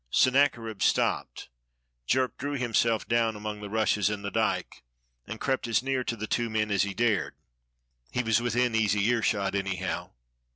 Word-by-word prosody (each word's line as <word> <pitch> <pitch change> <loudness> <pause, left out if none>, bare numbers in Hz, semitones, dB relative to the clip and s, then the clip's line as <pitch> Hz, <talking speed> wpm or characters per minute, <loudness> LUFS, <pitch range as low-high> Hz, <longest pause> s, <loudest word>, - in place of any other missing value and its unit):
Sennacherib 120 - +2
stopped. - - 0 0.6
Jerk 130 0 +1
drew 145 +2 -3
himself 115 -4 +1
down 115 -2 +1
among 105 0 -5
the 105 - -6
rushes 105 -1 +1
in 105 -1 -4
the 100 - -4
dyke - - -1 0.5
and 110 - -6
crept 130 -3 -1
as 115 +1 +1
near 135 -1 0
to 115 - -2
the 110 -1 -4
two 120 +1 -1
men 110 -1 -1
as 100 - +2
he 100 -1 -1
dared; 115 -1 +1 0.7
he 125 - -1
was 115 0 +2
within 120 0 +1
easy 105 -2 +2
earshot, 105 -4 +1
anyhow. 95 -3 -2
110 Hz, 165 wpm, -28 LUFS, 105-120 Hz, 0.7 s, Sennacherib